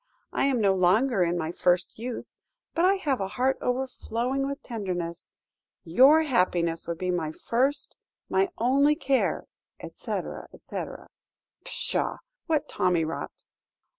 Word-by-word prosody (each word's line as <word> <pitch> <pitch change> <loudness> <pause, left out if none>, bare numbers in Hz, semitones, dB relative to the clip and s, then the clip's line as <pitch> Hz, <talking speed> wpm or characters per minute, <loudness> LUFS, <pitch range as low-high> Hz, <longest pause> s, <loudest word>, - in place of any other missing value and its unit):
I - - +2
am 270 -3 +2
no 200 -3 +4
longer 195 +5 +3
in 175 0 0
my 160 -1 -2
first 180 +3 +1
youth, 240 +1 -4 0.5
but 335 - +2
I 385 +2 +5
have 285 - -1
a 195 - -1
heart 255 +6 0
overflowing 255 +1 -1
with 280 0 -5
tenderness. 180 -7 -4 0.5
Your 270 - +6
happiness 180 - +1
would 170 -1 -3
be 180 +1 -1
my 165 -3 -1
first, 265 - -1 0.3
my 390 0 +2
only 275 +5 +4
care, 275 -4 0 0.3
etc., - - -5
etc.' - - -7 0.6
"Pshaw - - -1 0.3
what 315 -3 +1
tommy 175 -3 +1
rot! 160 - -6
235 Hz, 135 wpm, -27 LUFS, 180-275 Hz, 0.6 s, Your